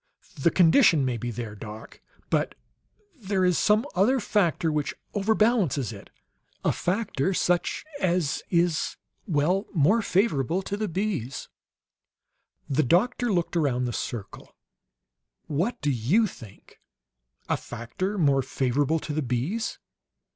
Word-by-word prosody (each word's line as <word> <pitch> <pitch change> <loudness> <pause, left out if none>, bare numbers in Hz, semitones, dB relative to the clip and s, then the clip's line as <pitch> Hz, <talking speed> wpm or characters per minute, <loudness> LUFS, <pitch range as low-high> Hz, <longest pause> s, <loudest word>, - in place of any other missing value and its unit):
"The 140 - +2
condition 165 - +5
may 125 -2 -1
be 120 +1 -4
there, 115 -2 -5
doc, 105 +1 -10 0.3
but - - +1 0.6
there 195 -7 0
is 180 -2 +3
some 215 +4 +3
other 230 +9 +3
factor 170 - +1
which 150 -1 -2 0.2
overbalances 205 - +2
it; 100 - -12 0.6
a - - +4
factor 190 -3 -1
such 175 0 0
as 175 -6 0
is 170 -2 +1 0.3
well, 175 +4 +1
more 180 +10 +4
favorable 185 - +1
to 200 - -3
the 215 +1 -2
bees." 175 - -3 1.2
The 145 +1 +2
doctor 220 - +2
looked 175 -2 0
around 135 -6 +1
the 120 - -3
circle. 105 -4 -6 0.9
"What 175 +11 -1
do 145 - +1
you 135 - +2
think? 115 - -12 0.7
'A - - +1
factor 120 - -4
more 140 -6 +3
favorable 135 +4 0
to 150 - -5
the 155 - 0
bees.' 135 - -2
165 Hz, 125 wpm, -26 LUFS, 130-195 Hz, 1.2 s, condition